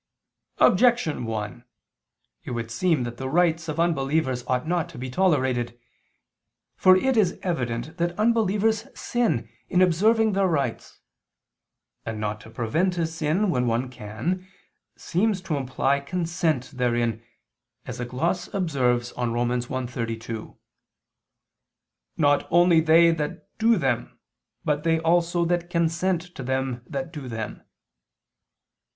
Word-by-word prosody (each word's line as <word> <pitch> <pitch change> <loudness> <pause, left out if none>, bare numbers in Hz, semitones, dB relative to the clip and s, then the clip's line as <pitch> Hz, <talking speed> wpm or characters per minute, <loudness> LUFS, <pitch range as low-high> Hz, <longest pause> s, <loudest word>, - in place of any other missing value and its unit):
Objection 230 - +3
1: 110 +1 -4 0.8
It - - -8
would 115 -1 -4
seem 160 -1 +1
that 120 +2 -6
rites 165 +3 +1
of 155 +1 -3
unbelievers 140 -5 +1
ought 125 +3 0
not 175 -1 0
to - - -11
be 125 +1 -5
tolerated. 130 -8 +1 1.0
For 185 0 +6
it 265 +7 +1
is 210 -6 +2
evident 135 -2 -2
that 175 0 -1
unbelievers 220 -1 +2
sin 205 - 0 0.2
in 180 - +2
observing 215 +5 +4
their 195 0 +2
rites: 140 -9 -2 1.0
and 110 -1 -5
not 105 0 -3
to 110 - -13
prevent 160 +12 0
a 165 - +1
sin, 165 +5 0
when 125 -4 +1
one 120 +2 0
can, 130 - -4 0.5
seems 200 +3 0
to 170 -4 -2
imply 135 +1 0
consent 165 -3 -1
therein, 120 -3 0 0.6
as - - -6
a 125 - -2
gloss 160 +9 -2
observes 125 -9 +1
on 120 -2 -2
Rom. 120 0 0
1:32: 120 -2 -4 1.6
"Not 145 -2 +3
only 175 -1 +5
they 165 +1 +6
that 150 -3 -5
do 225 0 +4
them, 130 -7 -1 0.5
but 150 -1 +1
they 165 -1 +2
also 170 +1 +2
that 175 0 -1
consent 170 +1 0
to - - -8
them 130 -1 -2
that 140 +4 -5
do 145 -5 -7
them." 110 -3 -5
155 Hz, 130 wpm, -25 LUFS, 125-175 Hz, 1.6 s, For